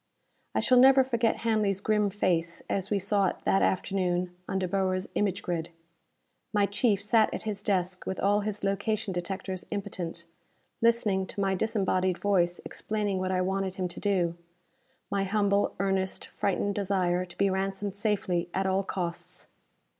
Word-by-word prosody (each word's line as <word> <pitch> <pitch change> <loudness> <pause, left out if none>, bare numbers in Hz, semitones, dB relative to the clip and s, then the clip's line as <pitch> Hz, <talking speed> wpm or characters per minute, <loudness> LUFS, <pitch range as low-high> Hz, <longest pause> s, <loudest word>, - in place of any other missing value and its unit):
I - - +3
shall 250 -1 +5
never 265 +1 +7
forget 235 -3 +1
Hanley's 210 -4 +2
grim 210 0 +2
face 170 -4 0
as 195 0 -1
we 205 - +2
saw 200 0 +2
it - - -1
that 195 - +3
afternoon 180 -1 0
on 190 - 0
De 185 -1 0
Boer's 185 0 0
image 200 -3 0
grid. 170 -1 -2 0.8
My 205 -1 +4
chief 205 0 +1
sat 215 +1 +3
at - - -5
his 210 -2 -3
desk 185 -3 -1
with 190 - -3
all 205 +1 +3
his 210 -1 -3
location 200 +1 -1
detectors 185 +1 -4
impotent, 175 -4 -5 0.6
listening 215 -5 +2
to - - -7
my 195 -1 +2
disembodied 185 -3 +1
voice 180 -4 +1
explaining 210 -3 -2
what 185 0 -1
I 185 -1 +1
wanted 190 0 -1
him 185 -1 -1
to - - -7
do. 180 -5 +1 0.8
My 200 -1 +1
humble, 200 0 +1
earnest, 190 -1 -1
frightened 200 +1 -1
desire 185 -3 +1
to 175 -1 -12
be 200 -1 +2
ransomed 195 +1 -2
safely 195 -4 0
at 190 - 0
all 190 +1 +2
costs! 175 -3 -4
195 Hz, 160 wpm, -28 LUFS, 185-205 Hz, 0.8 s, never